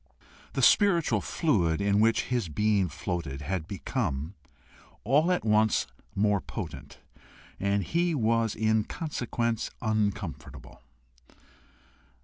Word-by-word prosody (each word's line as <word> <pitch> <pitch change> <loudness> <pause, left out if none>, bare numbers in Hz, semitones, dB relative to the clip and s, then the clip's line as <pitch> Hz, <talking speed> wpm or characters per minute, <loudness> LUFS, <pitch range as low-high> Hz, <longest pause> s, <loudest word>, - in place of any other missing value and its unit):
The - - -1
spiritual 185 -6 +4
fluid 90 - +1
in 100 0 +2
which 115 +1 +3
his 120 -8 -2
being 100 +2 +1
floated 70 -1 -4
had 80 +2 -3
become 95 - -3 0.7
all 150 - +3
at 180 - 0
once 110 0 +3 0.3
more 100 -1 +2
potent, - - -7 0.6
and 100 +1 +1
he 170 - 0
was 115 -3 +1
in 110 0 +2
consequence 120 -7 -2
uncomfortable. 105 -5 -3
110 Hz, 105 wpm, -28 LUFS, 95-120 Hz, 0.7 s, spiritual